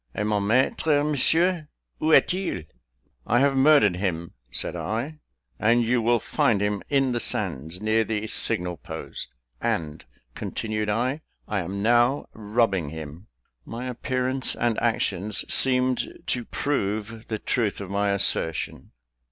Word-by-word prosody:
"Et 105 - -1
mon 105 -1 +1
maître, 140 +7 +2
Monsieur, 160 +3 +2 0.3
où 155 - +2
est 160 - +6
il?" 185 - -3 0.6
"I 120 - +3
have 140 +1 +3
murdered 135 -9 +5
him," 85 -3 -2 0.2
said - - -2
I, 130 +8 -3 0.4
"and 120 +2 +4
you 120 +1 +2
will 120 +1 +3
find 110 -1 +1
him 105 0 0
in 135 -2 +2
the 120 - 0
sands, 80 - -1
near 110 +1 +3
the 110 -1 -2
signal 90 -4 -1
post; - - -7 0.3
and," 75 -2 -2 0.3
continued 110 -1 -3
I, 125 +8 0 0.3
"I 105 - -1
am 95 +3 -4
now 120 +4 +3
robbing 105 -6 0
him!" 80 +3 -8 0.4
My 120 +2 -6
appearance 130 +1 -1
and 120 -2 0
actions 100 +3 0
seemed 130 -1 +2
to 120 -2 -1
prove 110 -4 -2
the 110 - -2
truth 110 -1 -1
of 100 -2 -6
my 100 +1 +1
assertion. 90 -4 -1
115 Hz, 140 wpm, -25 LUFS, 100-130 Hz, 0.6 s, est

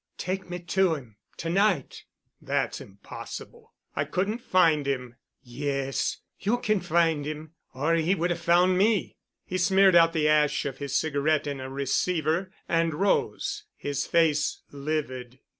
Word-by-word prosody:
"Take 185 0 -4
me 175 - -3
to 175 0 +1
him—to 125 +4 -10
night." 200 +4 +1 0.4
"That's - - -1
impossible. 465 -1 -10 0.2
I - - +1
couldn't 205 +6 -2
find 165 - +3
him." 125 -3 -3 0.3
"Yes. 135 +2 -2 0.2
You 215 +5 +1
can 215 -4 +1
find 165 -3 +2
him. 155 +1 -6 0.2
Or 150 +5 +1
he 165 +3 +2
would 175 0 0
have 175 - -2
found 180 +2 +4
me." 210 0 +1 0.3
He 185 - -3
smeared 190 +1 +5
out 165 -1 +6
the 155 -2 +2
ash 150 -2 +3
of 135 -2 -4
his 140 -1 -1
cigarette 155 0 +1
in 140 -2 -4
a 130 0 -6
receiver 160 +6 0 0.2
and 165 -2 +1
rose, 195 +4 0
his 145 0 -3
face 155 -3 +2
livid. 140 -4 -4
160 Hz, 145 wpm, -27 LUFS, 140-180 Hz, 0.4 s, out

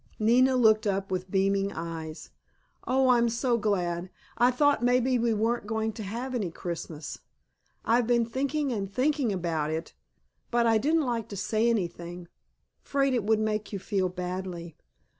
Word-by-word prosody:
Nina 250 +4 +4
looked 220 -3 +4
up 195 -1 -1
with 185 0 -2
beaming 195 +1 +1
eyes. 165 -2 -6 0.6
"Oh, 260 0 +3
I'm 235 -1 +4
so 240 +1 +1
glad! 180 -4 -1 0.3
I 245 - +4
thought 290 +2 +3
maybe 250 +1 +3
we 235 0 +2
weren't 225 +1 0
going 220 0 -1
to 220 - -7
have 235 +6 -4
any 210 -8 -1
Christmas. 165 -3 -6 0.7
I've 235 0 +3
been 240 -1 +3
thinking 275 +4 -1
and 200 -4 -3
thinking 270 +1 +1
about 165 -5 -1
it, 160 +1 -4 0.6
but 240 0 +2
I 225 -1 +4
didn't 310 +4 +2
like 235 -3 -2
to 200 - -6
say 220 +4 +1
anything, 175 -4 -3 0.5
'fraid 275 -1 +1
it 235 -5 0
would 220 0 +3
make 215 -1 -1
you 200 - -3
feel 190 -1 -1
badly." 180 -2 -5
215 Hz, 160 wpm, -28 LUFS, 185-245 Hz, 0.7 s, Nina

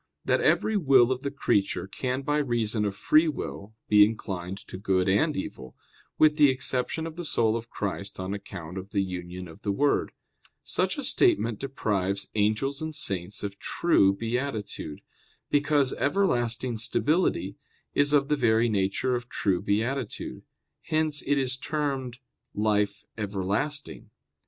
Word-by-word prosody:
6] - - -24
that - - +3
every 220 - +2
will 135 - +5
of 130 0 -1
the 140 - -2
creature 105 -10 0
can 125 +7 -3
by 145 +1 +1
reason 115 -5 0
of 100 -1 -2
free 155 +10 +4
will 110 -8 -5
be 105 -1 +7
inclined 95 -4 -2
to 100 - -11
good 95 -1 +1
and 125 +11 +2
evil; 65 -8 -6 0.4
with 155 -1 +5
the 145 -2 +7
exception 130 +4 -1
of 165 0 -7
the 175 - -4
soul 115 -8 +2
of 115 0 -5
Christ 100 -1 -4
on 95 +1 -3
account 95 -3 -7
of 95 +3 -11
the 100 -2 +2
union 90 -1 -6
of 80 - -13
the 100 - -1
Word. 140 +8 +1 0.5
Such - - -1
a - - -3
statement 110 +1 +2
deprives 100 -8 -2
angels 110 +7 0
and 155 -1 -4
saints 100 - -2
of 100 -1 -5
true 100 - +3
beatitude, 115 - -4 0.5
because 145 -2 +2
everlasting 125 - 0
stability 130 - 0 0.4
is 145 0 +3
of 140 -2 +4
the 150 - +2
very 115 -3 +3
nature 100 +5 0
of 125 0 -3
true 95 -3 0
beatitude; 115 +5 -2 0.4
hence 155 -2 0
it 145 +1 +3
is 130 -1 0
termed 135 -4 -2 0.4
"life 105 -1 0
everlasting." 105 +9 -2
115 Hz, 150 wpm, -27 LUFS, 100-140 Hz, 0.5 s, be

